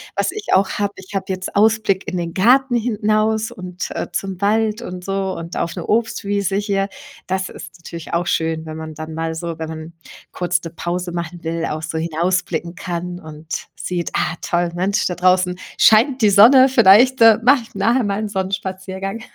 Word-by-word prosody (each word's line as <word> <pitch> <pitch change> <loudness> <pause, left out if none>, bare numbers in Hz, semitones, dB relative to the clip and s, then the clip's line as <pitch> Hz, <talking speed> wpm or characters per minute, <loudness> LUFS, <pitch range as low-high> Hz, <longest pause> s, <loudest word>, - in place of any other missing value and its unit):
was - - 0
ich 425 0 -7
auch 190 +1 +4
habe, 205 -1 -1
ich 190 +1 -12
habe 195 - -1
jetzt 185 +1 -4
Ausblick 210 -2 +2
in 185 - -3
den 170 -1 -3
Garten 250 +6 +4
hinaus 220 -1 0
und, 180 -5 -6
äh, - - -3
zum 195 -1 -4
Wald 215 +2 +1
und 180 -4 -7
so 195 -1 -2
und 165 +1 -6
auf 170 - -2
'ne 175 - -5
Obstwiese 205 -3 0
hier. 200 -1 -1 0.4
Das 190 0 -2
ist - - -11
natürlich 170 -1 -9
auch 170 +1 +1
schön, 160 0 -1
wenn 155 0 -7
man 160 -1 -7
dann 155 +1 -7
mal 160 0 -3
so 165 0 -5
wenn 160 -1 -4
man 160 +1 -8 0.4
kurz 180 0 0
'ne 165 - -6
Pause 175 +2 -4
machen 170 0 -5
will, 165 0 -2
auch 155 +1 -4
so 160 0 -3
hinausblicken 170 +1 -1
kann 175 +1 -5
und 155 0 -7
sieht: 175 -2 -3
„Ah, - - 0
toll, 175 0 0
Mensch, 190 +4 0
da 180 - -2
draußen 180 0 +2 0.2
scheint 235 +3 +4
die 205 - +5
Sonne 255 +7 +8
vielleicht, 240 +1 +6
äh, 225 -1 +8
mache 260 0 +5
ich 225 - -19
nachher 230 +6 +2
mal 200 -1 -1
'n 215 - -2
Sonnenspaziergang.“ 190 +1 -4
190 Hz, 190 wpm, -19 LUFS, 170-215 Hz, 0.4 s, Sonne